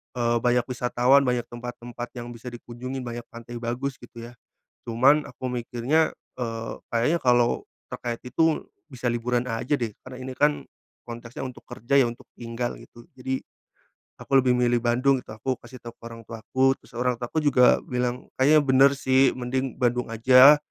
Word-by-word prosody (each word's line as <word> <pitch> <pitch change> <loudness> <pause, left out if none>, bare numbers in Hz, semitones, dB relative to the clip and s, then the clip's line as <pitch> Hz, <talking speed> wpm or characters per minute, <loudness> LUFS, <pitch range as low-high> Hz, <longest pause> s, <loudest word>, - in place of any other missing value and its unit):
eee, 120 -1 +1
banyak 125 -1 +2
wisatawan, 125 +2 +3
banyak 125 -2 0
tempat-tempat 120 0 -7
yang 120 0 -7
bisa 120 +2 -8
dikunjungi, 120 +2 -7
banyak 120 -1 -6
pantai 120 0 -9
bagus, 125 +4 -3
gitu, 120 -1 -10
ya, - - -17 0.5
cuman 135 +6 +4
aku 130 - -6
mikirnya 125 +6 0 0.3
eee, 115 -2 -4 0.2
kayaknya 120 +9 +2
kalau 120 -1 +3 0.3
terkait 120 -1 -4
itu 160 +5 +1 0.3
bisa 125 -1 -4
liburan 120 +1 0
aja, 115 +5 -2
deh, 115 - -1 0.2
karena 130 -1 -9
ini 130 0 -6
kan 150 0 +2 0.4
konteksnya 120 +2 -7
untuk 125 - -11
kerja, 125 +2 -2
ya, 125 - +4
untuk 115 - -11
tinggal, 120 +1 -4
gitu, 120 - -15
jadi 130 +1 -2 0.8
aku 135 - +3
lebih 125 -1 +2
milih 120 -1 +2
Bandung, 130 +3 +2
gitu - - -11
aku 130 +3 -2
kasih 125 - -12
tahu 120 -1 -8
ke - - -56
orang 115 0 -10
tuaku, 130 +4 0
terus - - -21
orang 125 -1 +1
tuaku 120 +6 -2
juga 125 -3 +5
bilang, 125 0 -3
"Kayaknya 150 +3 +6
bener, 135 +1 +6
sih, 130 0 +3
mending 130 +1 -2
Bandung 125 -1 0
aja. 130 +5 +8
125 Hz, 170 wpm, -25 LUFS, 120-130 Hz, 0.8 s, aja